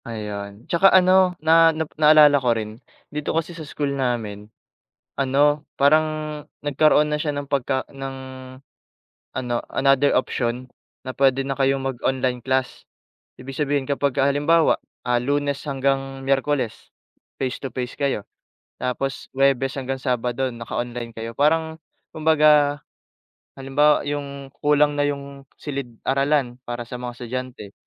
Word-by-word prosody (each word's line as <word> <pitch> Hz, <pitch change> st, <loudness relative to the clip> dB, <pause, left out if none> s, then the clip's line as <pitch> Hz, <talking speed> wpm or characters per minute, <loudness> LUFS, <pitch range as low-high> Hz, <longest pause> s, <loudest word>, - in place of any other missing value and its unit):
Ayun, 105 Hz, -1 st, -6 dB
tsaka 185 Hz, +3 st, +4 dB
ano, 185 Hz, -1 st, +4 dB
na 165 Hz, +1 st, +6 dB
na 160 Hz, -, -1 dB
naalala 150 Hz, -2 st, +6 dB
ko 120 Hz, -2 st, +2 dB
rin 110 Hz, +2 st, -6 dB, 0.3 s
dito 150 Hz, +1 st, -2 dB
kasi 165 Hz, +1 st, -2 dB
sa 165 Hz, -, -9 dB
school 145 Hz, -1 st, -3 dB
namin, 115 Hz, -6 st, -3 dB, 0.7 s
ano, 145 Hz, +2 st, +2 dB, 0.2 s
parang 155 Hz, +3 st, +5 dB, 0.6 s
nagkaroon 150 Hz, +1 st, +4 dB
na 150 Hz, -, 0 dB
siya 150 Hz, -3 st, -1 dB
ng 145 Hz, -, -4 dB
pagka 135 Hz, -2 st, 0 dB
ng 135 Hz, -1 st, -7 dB, 1.2 s
ano, 125 Hz, -2 st, -2 dB, 0.2 s
another 135 Hz, +1 st, +3 dB
option 125 Hz, 0 st, -2 dB, 0.4 s
na 130 Hz, -, -4 dB
puwede 135 Hz, 0 st, +3 dB
na 135 Hz, -, -1 dB
kayong 135 Hz, 0 st, +2 dB
mag-online 130 Hz, -1 st, -1 dB
class. 130 Hz, 0 st, -1 dB, 0.6 s
Ibig 135 Hz, +1 st, -8 dB
sabihin 145 Hz, -2 st, 0 dB
kapagka 140 Hz, -1 st, +1 dB
halimbawa, 145 Hz, +4 st, +3 dB, 0.3 s
ah, 120 Hz, 0 st, +2 dB
Lunes 140 Hz, +1 st, 0 dB
hanggang 135 Hz, 0 st, -1 dB
Miyerkules, 135 Hz, -3 st, -1 dB, 0.5 s
face 130 Hz, 0 st, -2 dB
to 135 Hz, -, -4 dB
face 125 Hz, 0 st, -4 dB
kayo. 140 Hz, -8 st, -1 dB, 0.6 s
Tapos 130 Hz, +2 st, -3 dB
Huwebes 135 Hz, -1 st, +2 dB
hanggang 135 Hz, 0 st, -3 dB
Sabado 125 Hz, 0 st, -1 dB
naka-online 120 Hz, 0 st, -5 dB
kayo. 115 Hz, +1 st, -5 dB
Parang 160 Hz, +4 st, +1 dB, 0.4 s
kumbaga 150 Hz, -2 st, +4 dB, 0.8 s
halimbawa 145 Hz, +3 st, +3 dB
yung 140 Hz, -1 st, -5 dB
kulang 145 Hz, 0 st, +3 dB
na 145 Hz, -, +2 dB
yung 140 Hz, -1 st, -6 dB
silid-aralan 135 Hz, 0 st, -1 dB
para 120 Hz, 0 st, -4 dB
sa 125 Hz, -, -6 dB
mga 125 Hz, -1 st, -5 dB
estudyante, 125 Hz, -4 st, -6 dB
135 Hz, 130 wpm, -22 LUFS, 125-145 Hz, 1.2 s, na